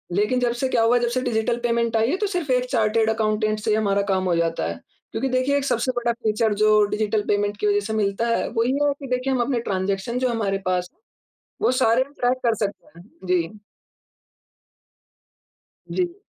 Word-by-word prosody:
लेकिन 210 +5 +2
जब 240 -1 +1
से 265 - +2
क्या 235 - +2
हुआ, 240 +2 +4
जब 240 - 0
से 255 +1 -1
डिजिटल 235 -1 0
पेमेंट 235 -1 0
आई 225 +3 +2
है, 360 - 0
तो 415 - -1
सिर्फ 355 -7 -3
1 250 0 +2
चार्टेड 220 -1 +2
अकाउंटेंट 215 -1 0
से 215 - -1
ही - - +4
हमारा 200 -2 +1
काम 185 0 +1
हो 175 -2 +1
जाता 165 - 0
है। 85 0 -5 0.3
क्योंकि 265 - -2
देखिए, 255 +3 +1
एक 280 - -2
सबसे 255 0 0
बड़ा 240 0 +1
फीचर 220 -2 0
जो 215 -1 +5
डिजिटल 215 0 0
पेमेंट 205 0 0
की 210 - 0
वजह 205 0 +3
से 220 - -3
मिलता 210 +2 0
है, 230 - 0
वो 230 -1 0
ये 275 +4 +1
है 285 - +2
कि 275 - -7
देखिए 255 +1 -1
हम 250 - +1
अपने 245 -1 0
ट्रांज़ेक्शन 195 +5 -1
जो 255 -1 +1
हमारे 205 -4 -1
पास, 180 -1 0 0.7
वो - - +3
सारे 235 +3 +4
हम 280 +2 -19
ट्रैक 250 +1 +2
कर 230 -1 +3
सकते 200 - -8
हैं। - - -13 0.2
जी। 175 -2 +2 2.4
जी। 355 -1 -1
230 Hz, 210 wpm, -23 LUFS, 210-250 Hz, 2.4 s, जो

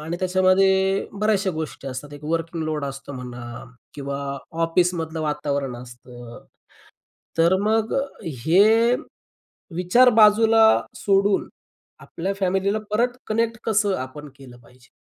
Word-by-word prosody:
आणि 165 +3 -4
त्याच्यामध्ये 190 +1 +2
बऱ्याचशा 205 -1 0
गोष्टी 160 -4 -6
असतात. 135 +3 -7
एक 145 +1 -11
वर्किंग 165 +1 -2
लोड 155 -2 -2
असतो 140 0 -7
म्हणा 120 -2 -8 0.3
किंवा 140 -1 -5 0.5
ऑफिसमधलं 165 -1 0
वातावरण 145 -4 -2
असतं. 120 -1 -12 0.9
तर 170 +3 +4
मग 220 +1 0 0.3
हे 200 - +3 0.8
विचार 185 +9 +4
बाजूला 220 +1 +6 0.3
सोडून 200 0 +1 0.5
आपल्या 190 +4 -4
फॅमिलीला 195 +2 0
परत 245 +3 0
कनेक्ट 230 +1 -1
कसं 210 -3 +1
आपण 145 +3 -7
केलं 130 -3 -14
पाहिजे? 125 +1 -22
170 Hz, 110 wpm, -22 LUFS, 140-200 Hz, 0.9 s, बाजूला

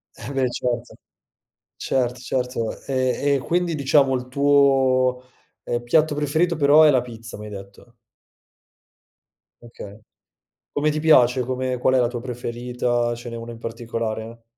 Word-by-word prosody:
Eh - - -8
beh 130 -2 +1
certo. 120 -1 -3 0.8
Certo, 125 -2 -1
certo. 125 -3 -3
E 135 +2 0
e - - 0
quindi 175 +4 -1
diciamo 140 -1 +3
il 125 0 -3
tuo, 135 -2 +3 0.4
ehm, 120 0 -2
piatto 150 +5 +2
preferito 155 +4 0
però 145 +1 +6
è 155 - +7
la 130 -3 +3
pizza, 115 -2 -10
mi 105 - -8
hai - - -9
detto. 100 +4 -12 1.7
Okay, 110 -3 -11 0.7
come 150 +1 0
ti 155 0 -2
piace? 130 -5 +4
Come 130 0 -2
qual 130 +1 +2
è - - +4
la 120 -1 +2
tua 120 -1 -5
preferita? 120 -1 -2
Ce 120 0 -9
n'è 115 - -6
una 115 +1 -7
in 115 - -11
particolare? 115 0 -5
125 Hz, 150 wpm, -22 LUFS, 120-140 Hz, 1.7 s, è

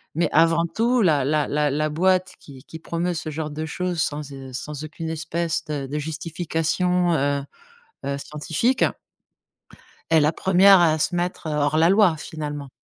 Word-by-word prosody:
Mais 170 +1 +2
avant 165 +1 +4
tout, 235 +5 +1
la 150 -8 +3
la 150 +1 +1
la 150 +1 0
boîte 185 +3 +1
qui 135 -3 -14
qui 160 - -10
promeut 170 +2 -2
ce 160 -1 -5
genre 155 0 -4
de 155 +2 -4
choses 175 +1 -2
sans, 145 -1 -3
heu, 135 -1 -9
sans 150 +3 -6
aucune 160 +1 -6
espèce 165 +1 -2
de 145 -3 -4
de 150 +3 -3
justification, 165 +3 -1
heu, 140 0 0 0.6
heu, 140 0 -2
scientifique 160 - 0 1.3
est 160 -1 +5
la 150 +2 +3
1re 190 +2 +5
à 160 -2 +3
se 175 - 0
mettre, 175 -2 -3
heu, - - -2
hors 150 +1 +1
la 165 +3 +4
loi, 195 -5 +4
finalement. 150 -3 -6
160 Hz, 170 wpm, -23 LUFS, 150-175 Hz, 1.3 s, est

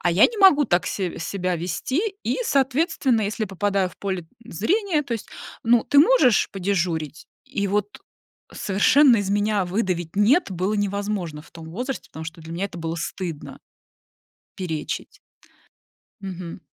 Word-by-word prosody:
А 175 - +2
я 180 +5 +5
не 465 - -8
могу 370 -7 +7
так 180 -4 +1
се 185 -4 -3
себя 180 +1 -2
вести, 180 - -2 0.2
и, - - 0
соответственно, 270 - +1
если 215 +2 -2
попадаю 195 0 0
в - - -19
поле 190 -4 -3 0.2
зрения, 325 - 0
то 275 - -6
есть, 225 - -7 0.4
ну, 230 0 +4
ты 285 - +5
можешь 290 - +5
подежурить? 170 -6 -2 0.2
И, 200 0 -2
вот, 205 +1 0 0.6
совершенно 235 +6 +4
из 200 -1 -2
меня 205 -1 +1
выдавить 180 -2 -2
"нет" 225 - +3
было 185 +3 -1
невозможно 200 -6 -2
в - - -19
том 160 -1 -10
возрасте, 250 +8 -5
потому 160 0 -8
что 165 +1 -8
для 160 +1 -9
меня 175 +4 -2
это 175 - -10
было 165 0 -3
стыдно 170 -2 -5 1.0
перечить. 160 -5 -4 1.0
Мгм. 185 -3 -7
200 Hz, 150 wpm, -23 LUFS, 175-230 Hz, 1.0 s, могу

